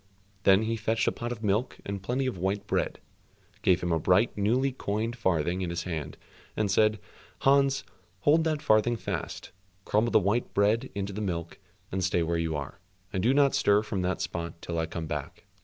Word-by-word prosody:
Then 95 +2 +6
he 115 +1 -1
fetched 110 +1 0
a - - +4
pot 120 +1 -5
of 115 -2 -6
milk 105 +5 0
and 100 -1 -4
plenty 125 +7 -1
of 125 -9 -3
white 95 +3 -1
bread, - - -1 0.6
gave 90 -1 +3
him 90 - 0
a 80 - +2
bright 90 +8 +3
newly 120 +7 +2
coined 115 -1 -2
farthing 90 -5 0
in 90 - -2
his 85 -1 -3
hand, 80 -5 -5 0.4
and 105 -2 +1
said, 110 +2 +3 0.4
"Hans, 135 0 +4 0.4
hold 155 +8 +4
that 155 -2 -1
farthing 110 -2 +3
fast, 105 - -5 0.3
crumble 110 +3 +2
the - - +5
white 105 +6 0
bread 110 +6 +2
into 100 0 -3
the 105 - -4
milk, 85 -4 -4 0.3
and 95 0 -1
stay 90 -3 +2
where 85 +1 0
you 80 -1 -1
are, 75 +4 -6 0.3
and 95 - 0
do 120 - +3
not 140 0 +4
stir 100 +1 +3
from 100 -3 -3
that 90 +1 -1
spot 85 0 -4
till 85 -1 -3
I 80 - -1
come 80 0 -5
back." - - -6
100 Hz, 200 wpm, -28 LUFS, 90-115 Hz, 0.6 s, Then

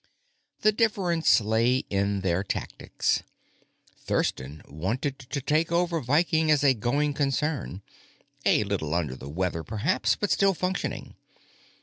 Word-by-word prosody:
The 215 - +5
difference 195 - +2
lay 115 +4 +2
in 100 0 0
their 95 0 0
tactics. 100 - -2 0.8
Thurston 70 +4 -2
wanted 110 - -3
to 135 +2 -5
take 155 +4 +1
over 170 -1 +1
Viking 155 +4 +2
as 150 -2 +4
a 140 -2 +5
going 140 +6 0
concern 140 - -2 0.6
a - - +3
little 90 -6 -2
under 75 -7 -1
the 65 +2 -9
weather, 85 +1 -2
perhaps, 110 - 0
but 205 - -2
still 195 -1 +3
functioning. 185 +3 -3
130 Hz, 125 wpm, -26 LUFS, 100-160 Hz, 0.8 s, The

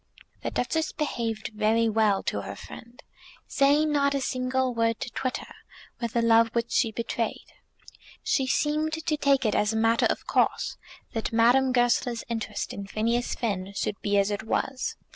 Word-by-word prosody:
The - - -2
Duchess 315 +6 -1
behaved 230 -7 -3
very 220 +1 +2
well 215 -3 +2
to - - -2
her - - -7
friend, 235 +1 -12 0.4
saying 290 +2 +3
not 280 -1 +2
a - - +1
single 255 0 -1
word 230 -1 +1
to 250 - -4
twit 255 0 -2
her - - -11 0.5
with 235 -2 -3
the 235 - +1
love 230 0 +5
which 235 0 -1
she 225 - +2
betrayed. 230 +1 -4 0.7
She 265 -2 +1
seemed 305 +3 0
to 320 - -3
take 275 -3 +2
it 215 - +2
as 210 +1 +1
a - - -1
matter 225 +1 +3
of - - -2
course - - +1 0.4
that 225 -2 -2
Madame 245 +4 +4
Goesler's 245 -1 +1
interest 225 -2 -3
in 200 0 -6
Phineas 230 +4 -1
Finn 200 -4 -3
should 200 0 -3
be 205 0 +1
as 200 +1 +2
it 205 - -2
was. 255 +4 -2
235 Hz, 175 wpm, -27 LUFS, 220-260 Hz, 0.7 s, love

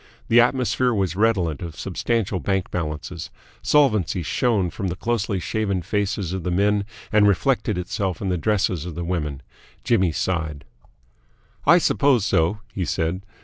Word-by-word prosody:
The 120 +1 +7
atmosphere 125 0 +1
was 95 -4 0
redolent 95 -8 +1
of 85 -3 -6
substantial 100 +1 -1
bank 95 -1 -1
balances. 80 0 -4 0.3
Solvency 105 - +2
shone 100 +1 +1
from 95 - -4
the 90 - -2
closely 110 -2 -1
shaven 100 -2 -1
faces 100 -1 -1
of 95 - -3
the 90 - -3
men 100 +3 +2 0.3
and 105 -1 +5
reflected 105 +1 +1
itself 90 0 -2
in 100 - -2
the 90 - +1
dresses 95 -4 0
of 85 - -7
the 85 - -4
women. 75 -6 -3 0.4
Jimmy 95 -7 +2
sighed. 80 -3 -2 1.0
"I 170 +3 +8
suppose 140 - +3
so," 100 +2 +1
he 95 - -2
said. 85 +3 -1
95 Hz, 150 wpm, -23 LUFS, 85-110 Hz, 1.0 s, I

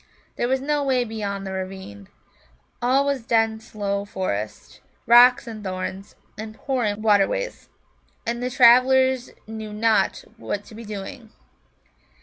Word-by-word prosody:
There 240 - -1
was 260 +1 0
no 295 +1 0
way 260 -2 +2
beyond 205 -4 -4
the 190 - -5
ravine. 185 - -7 0.7
All 260 +3 +3
was 280 -4 -1
dense 225 -1 0
low 200 -1 -1
forest, 110 - -5 0.2
rocks 245 +2 +7
and 220 -3 -8
thorns, 190 +1 -5 0.2
and 215 0 -7
pouring 220 -6 -2
waterways. 220 - +1 0.6
And 235 +1 -2
the 250 - -1
travellers 255 +1 +5 0.2
knew 220 -1 -7
not 215 -2 +1
what 205 -2 -4
to - - -14
be 230 +1 -9
doing. 215 +3 -8
220 Hz, 135 wpm, -23 LUFS, 200-250 Hz, 0.7 s, rocks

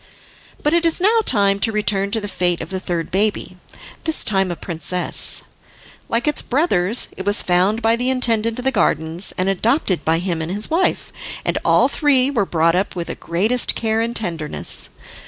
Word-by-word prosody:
But 295 - +1
it 340 0 +2
is 330 +1 +1
now 430 +5 +3
time 200 -1 +2
to 225 - +3
return 205 -2 0
to 225 +2 -1
the 205 - -6
fate 175 -3 -1
of - - -7
the 190 - -3
third 175 -3 -4
baby, 195 -2 -1 0.5
this 320 -1 +1
time 190 -2 0
a 175 - -3
princess. 175 +2 0 0.7
Like 230 +5 -1
its 300 - 0
brothers, 240 - 0
it 190 - -5
was 205 +1 +3
found 190 +6 +1
by 225 +1 +3
the 245 +2 -1
intendant 230 -3 +1
of 250 - -6
the 265 - +2
gardens, 165 -5 0
and 185 - 0
adopted 195 - 0
by 160 +1 +1
him 170 -2 -2
and 160 +2 -4
his 210 +7 0
wife, 345 +4 0 0.3
and - - 0
all - - +4
three 280 -3 +2
were 215 -8 0
brought 165 0 +2
up 190 +3 -1
with 170 -1 -5
the - - -4
greatest 215 +9 0
care 225 0 -1
and 235 +1 -3
tenderness. 165 -7 -1
205 Hz, 190 wpm, -19 LUFS, 180-240 Hz, 0.7 s, all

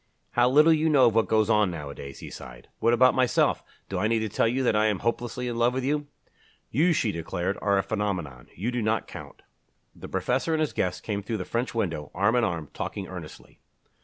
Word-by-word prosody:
"How 120 +1 +3
little 150 +5 +6
you 160 0 +2
know 140 -4 +5
of 115 - +4
what 115 0 +2
goes 110 -1 +2
on 105 -3 +3
nowadays!" 70 -4 -8
he - - -8
sighed. - - -11
"What 115 - +3
about 130 +2 +5
myself? 130 -1 +2 0.3
Do 95 - -3
I 105 - +1
need 115 0 +1
to 110 - -2
tell 110 - +1
you 130 +3 0
that 120 - +2
I 105 +1 +3
am 105 -2 +1
hopelessly 120 +1 -2
in 120 -1 -3
love 120 +1 +2
with 130 - -1
you?" 145 +2 -1 0.6
"You," 160 +9 +3
she 115 -9 +1
declared, 90 +2 -3
"are 100 -1 +2
a 95 - +1
phenomenon. 90 - -3
You 110 +8 -2
do 125 -1 -2
not 110 0 0
count." - - -11 0.5
The - - -10
professor 130 +6 0
and - - -1
his 155 -2 0
guest 90 -1 -2
came 105 -2 -2
through 110 +2 -3
the 90 - -5
French 120 +1 -2
window, 80 -9 -2
arm 100 +6 +2
in 120 - +3
arm, 85 -6 -2
talking - - -5
earnestly. - - -10
110 Hz, 225 wpm, -26 LUFS, 95-125 Hz, 0.6 s, little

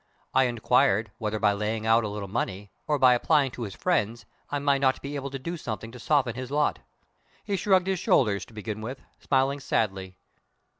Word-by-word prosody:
I 130 0 +5
inquired 110 -3 +2
whether 110 -1 -2
by 105 -1 +3
laying 110 +2 -2
out 115 +1 +4
a - - -1
little 100 -1 -5
money, 100 -1 -3 0.2
or 150 -1 +2
by 130 -2 +6
applying 140 +2 +2
to 120 - -9
my 110 - -3
friends, 115 - -1 0.2
I 145 - -1
might 140 -1 +1
not 130 -1 +2
be 140 +1 -5
able 140 -1 -4
to 135 - -5
do 170 +6 -5
something 115 -5 -6
to 125 - -11
soften 135 -2 +1
his 130 +1 -6
lot. 150 +1 +1 0.6
He 200 - -1
shrugged 190 -1 +3
his 190 -1 -1
shoulders, 105 -11 +2
to - - -19
begin 110 0 -5
with, 125 +4 -6 0.2
smiling 135 +1 +1
sadly. 95 -7 -1
120 Hz, 200 wpm, -27 LUFS, 105-140 Hz, 0.6 s, by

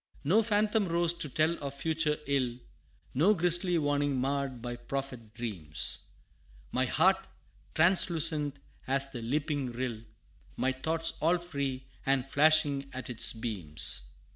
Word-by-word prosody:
No 185 +10 +4
phantom 215 -1 +1
rose 170 0 +2
to 165 -3 -4
tell 155 +5 +1
of 140 0 -4
future 155 +1 0
ill, 130 -4 0 0.6
No 185 +11 +4
grisly 175 0 +3
warning 145 -3 0
marr'd 135 -2 -2
my 120 -1 -4
prophet 120 -2 -6
dreams 95 -11 -5 0.7
My 130 +1 +1
heart 185 +9 +3 0.6
translucent 160 -4 +4 0.3
as 135 +1 0
the 125 -4 -6
leaping 140 +1 -2
rill, 120 -2 -4 0.6
My 130 - +1
thoughts 160 +5 +1
all 170 +3 +3
free 140 -6 -4 0.2
and 135 -1 +1
flashing 145 -1 +3
at 130 -1 -5
its 115 - +2
beams. 80 - -3
140 Hz, 130 wpm, -30 LUFS, 125-165 Hz, 0.7 s, No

